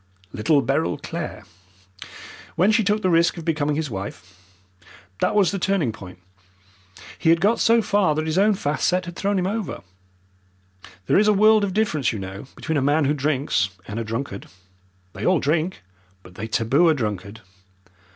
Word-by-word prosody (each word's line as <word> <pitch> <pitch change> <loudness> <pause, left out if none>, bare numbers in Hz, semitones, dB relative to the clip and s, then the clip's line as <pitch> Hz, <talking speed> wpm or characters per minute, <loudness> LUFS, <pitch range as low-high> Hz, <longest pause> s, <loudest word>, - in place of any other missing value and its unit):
"Little 140 +6 +2
Beryl 140 +4 0
Clare, 165 -2 -6 1.1
when 190 +5 +3
she 220 +1 +3
took 210 +1 0
the 185 - +2
risk 170 +2 +3
of 165 - -7
becoming 150 -2 0
his 150 -3 -3
wife. 95 -2 -7 0.8
That - - +1
was 200 -4 +4
the 200 - -3
turning 180 -9 0
point. 90 -4 -11 1.0
He - - +2
had 165 0 +5
got 210 +6 +2
so 230 0 +4
far 195 -8 +2
that 155 +1 -1
his 160 +3 0
own 210 +1 +4
fast 150 -5 -1
set 180 0 +1
had 175 0 -8
thrown 200 +2 -1
him 180 - 0
over. 210 +1 -3 1.2
There - - +3
is 210 - +3
a 210 - +5
world 215 +1 +5
of 195 -2 -2
difference, 155 - +1
you 110 - -5
know, 95 +5 -7
between 160 -3 -2
a - - -1
man 145 +2 +2
who 145 - +2
drinks 140 -8 0 0.2
and 105 +2 -5
a - - -2
drunkard. 115 -1 -5 0.7
They - - -7
all 185 -2 +3
drink, 160 - -1 0.4
but 90 - -15
they 110 +5 -6
taboo 130 +10 +2
a 160 - +3
drunkard. 105 -3 -4
155 Hz, 180 wpm, -22 LUFS, 120-195 Hz, 1.2 s, had